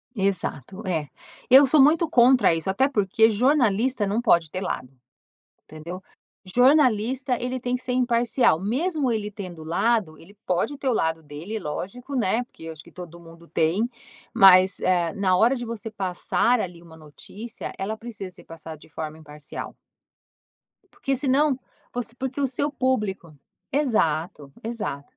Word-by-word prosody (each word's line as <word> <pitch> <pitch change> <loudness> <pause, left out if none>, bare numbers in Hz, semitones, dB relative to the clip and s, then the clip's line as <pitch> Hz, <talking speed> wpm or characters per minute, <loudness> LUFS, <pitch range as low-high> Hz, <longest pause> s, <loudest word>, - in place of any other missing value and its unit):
Exato. 195 - -2
É. 160 -5 -1 0.4
Eu 270 +3 +9
sou 275 +2 +5
muito 315 +3 +4
contra 250 - +5
isso, 165 +3 -2
até 265 +8 +2
porque 220 -1 +3
jornalista 245 -2 +2
não 210 +4 0
pode 170 -9 +3
ter 185 - -3
lado, 130 -8 -4 0.8
entendeu? 170 +4 -9 0.4
Jornalista, 250 +1 +3
ele 255 +1 -2
tem 245 0 -2
que 250 - -2
ser 250 - -3
imparcial, 240 -6 +2
mesmo 275 - -1
ele 210 -2 -2
tendo 180 -6 -8
lado 175 0 0
ele 200 +5 -17
pode 180 +11 0
ter 270 -1 -3
o 255 - +3
lado 160 -5 0
dele, 155 +9 -6
lógico, 205 - -6
né, 235 0 +1
porque 165 - -16
eu 165 - -6
acho 155 -1 -13
que - - -17
todo 170 -1 -10
mundo 165 0 -15
tem. 175 +9 +1 0.5
Mas, 190 -1 +7
eh, 175 -3 +1
na 190 -2 +1
hora 240 +6 +4
de 240 - -5
você 225 -2 -6
passar 205 +4 0
ali 175 -2 -6
uma 160 -1 -15
notícia, 205 +9 -9
ela 210 +3 -3
precisa 215 -5 -8
ser 180 - -13
passada 165 -1 -10
de 155 - -18
forma 155 0 -6
imparcial. 150 -1 -9 1.2
Porque 270 - -2
senão 275 +1 +2 0.3
por 245 - -3
porque 265 +1 -4
o 275 - +2
seu 285 +3 -2
público 210 - -2 0.4
Exato, 165 - 0
exato. 205 -12 -4
210 Hz, 155 wpm, -24 LUFS, 170-250 Hz, 1.2 s, Eu